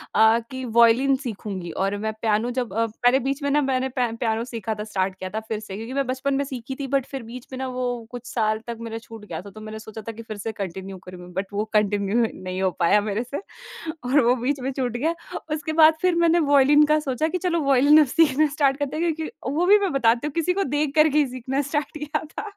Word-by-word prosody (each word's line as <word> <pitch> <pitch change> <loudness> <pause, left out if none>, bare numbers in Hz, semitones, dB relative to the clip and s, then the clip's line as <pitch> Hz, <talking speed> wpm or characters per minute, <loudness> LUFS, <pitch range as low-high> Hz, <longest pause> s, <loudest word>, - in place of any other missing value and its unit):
अ, 220 +1 +6
कि 260 0 -5 0.2
वायलिन 245 +4 +5
सीखूँगी 195 -6 -5
और 200 +1 -1
मैं 220 - -1
पियानो 225 +2 +1
जब 240 -6 -3
अ, 230 +2 +1
पहले 245 +4 +2
बीच 275 +2 -1
में 285 - +1
न 295 +1 +3
मैंने 265 0 0
प 245 -1 +2
पियानो 225 -1 0
सीखा 225 -3 -4
था - - -2
स्टार्ट 190 -3 -2
किया 185 0 -6
था - - 0
फिर 220 - -2
से। 215 -3 -8
क्योंकि 225 +4 -6
मैं 275 0 0
बचपन 260 +2 -1
में 280 - +1
सीखी 265 -1 -6
थी। 275 - -3
बट 270 - -3
फिर 270 -3 -6
बीच 235 +2 -10
में - - -4
न - - -3
वो 255 0 0 0.2
कुछ 245 -1 -8
साल 215 -2 +1
तक 235 -1 -4
मेरा 225 -1 -5
छूट 225 -2 -12
गया 165 -5 -6
था 200 - -11
तो 215 - -11
मैंने 215 0 -7
सोचा 220 0 -9
था - - -2
कि 225 - -9
फिर 220 -2 -7
से 215 +2 -4
कंटिन्यू 190 +1 -5
करूँ। 180 -1 -10
बट 190 +2 -2
वो 205 +1 -1
कंटिन्यू 210 +2 +2 0.2
नहीं 185 0 -4
हो 190 - +3
पाया 190 +4 +4
मेरे 210 +2 -2
से 265 +7 -5 0.6
और 265 +4 +4
वो 245 +1 +4
बीच 265 +3 -1
में 265 +2 -2
छूट 255 -2 -2
गया। 315 +7 0 0.4
उसके 315 +1 -4
बाद 315 0 +7
फिर 365 -1 +3
मैंने 340 0 +4
वायोलिन 290 -1 +5
का 305 +1 +3
सोचा 290 +1 -1
कि 365 - -1
चलो 345 -1 0
वायलिन 280 +2 +6
अब 305 - +6
सीखना 310 +1 +3
स्टार्ट 280 -2 +1
करते 285 0 -3
हैं 335 0 +1
क्योंकि 320 0 -5 0.2
वो 335 +4 +1
भी 405 +3 +7
मैं 395 -3 0
बताती 235 0 +2
हूँ - - -4
किसी 335 +2 +1
को 395 +2 0
देख 290 -1 -1
कर 310 0 +6
के 295 - 0
ही 290 - +3
सीखना 255 +2 -2
स्टार्ट 295 +2 -3
किया 300 0 -3
था। 305 - -7
250 Hz, 255 wpm, -24 LUFS, 220-290 Hz, 0.6 s, बाद